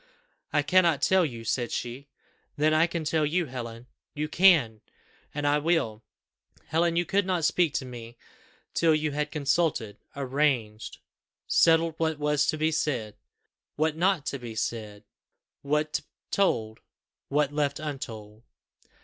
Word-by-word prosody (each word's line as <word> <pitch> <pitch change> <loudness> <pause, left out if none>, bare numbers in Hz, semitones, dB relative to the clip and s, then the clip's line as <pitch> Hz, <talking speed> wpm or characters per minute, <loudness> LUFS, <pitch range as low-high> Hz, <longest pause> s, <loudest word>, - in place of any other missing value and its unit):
"I 150 -1 +2
cannot 170 -3 +3
tell 190 -1 +4
you," 120 -8 -4
said 120 +1 -1
she. 130 +4 -5 0.5
"Then 155 +1 +2
I 160 +2 +4
can 170 -1 -3
tell 155 0 +1
you, 165 +4 +1
Helen." 120 -3 -7 0.3
"You 150 +1 -2
can!" 155 - +4 0.5
"And 145 0 -4 0.2
will. 135 -10 0 0.6
Helen, 165 +2 +1
you 175 +1 +1
could 200 +3 +1
not 180 -4 0
speak 170 -2 +2
to 130 - -1
me 120 -2 -9 0.6
till 165 -2 +3
you 155 0 -1
had 150 +1 -2
consulted 145 -7 0 0.2
arranged 130 -6 -1 0.5
settled 165 0 +4
what 160 -1 0
was 150 -1 +1
to 155 - 0
be 155 +1 +1
said 125 -9 -2 0.6
what 155 0 0
not 175 -2 +1
to 140 -1 -3
be 120 -2 -8
said 110 -2 -4 0.6
what 150 +2 0 0.3
told 110 - 0 0.5
what 145 0 +1
left 145 -1 0
untold." 110 -8 -7
150 Hz, 140 wpm, -27 LUFS, 120-160 Hz, 0.6 s, tell